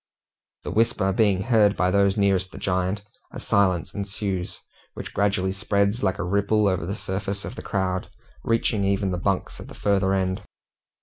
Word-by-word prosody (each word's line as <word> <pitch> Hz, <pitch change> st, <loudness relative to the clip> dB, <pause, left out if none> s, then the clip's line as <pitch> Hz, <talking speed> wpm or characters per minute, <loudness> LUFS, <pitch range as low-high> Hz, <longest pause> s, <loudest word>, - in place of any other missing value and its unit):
The -, -, -4 dB
whisper 105 Hz, -4 st, +2 dB
being 100 Hz, -3 st, +2 dB
heard 105 Hz, -3 st, +3 dB
by 90 Hz, 0 st, +2 dB
those 100 Hz, 0 st, +3 dB
nearest 95 Hz, -2 st, +2 dB
the -, -, -10 dB
giant, 95 Hz, +2 st, -1 dB, 0.3 s
a -, -, -7 dB
silence 95 Hz, -4 st, +1 dB
ensues, 100 Hz, -2 st, -3 dB, 0.4 s
which -, -, -7 dB
gradually 100 Hz, -2 st, +1 dB
spreads 100 Hz, +2 st, 0 dB
like 95 Hz, -1 st, +1 dB
a 100 Hz, -, -2 dB
ripple 100 Hz, +3 st, +2 dB
over 95 Hz, -3 st, 0 dB
the 100 Hz, -, -2 dB
surface 100 Hz, 0 st, -3 dB
of -, -, -6 dB
the -, -, -8 dB
crowd, 95 Hz, -2 st, -2 dB, 0.3 s
reaching 115 Hz, -2 st, +1 dB
even 100 Hz, 0 st, +1 dB
the 90 Hz, -, -2 dB
bunks 95 Hz, +1 st, -1 dB
at -, -, -9 dB
the -, -, -11 dB
further 95 Hz, -1 st, +1 dB
end. 95 Hz, +2 st, -1 dB
100 Hz, 175 wpm, -24 LUFS, 95-100 Hz, 0.4 s, heard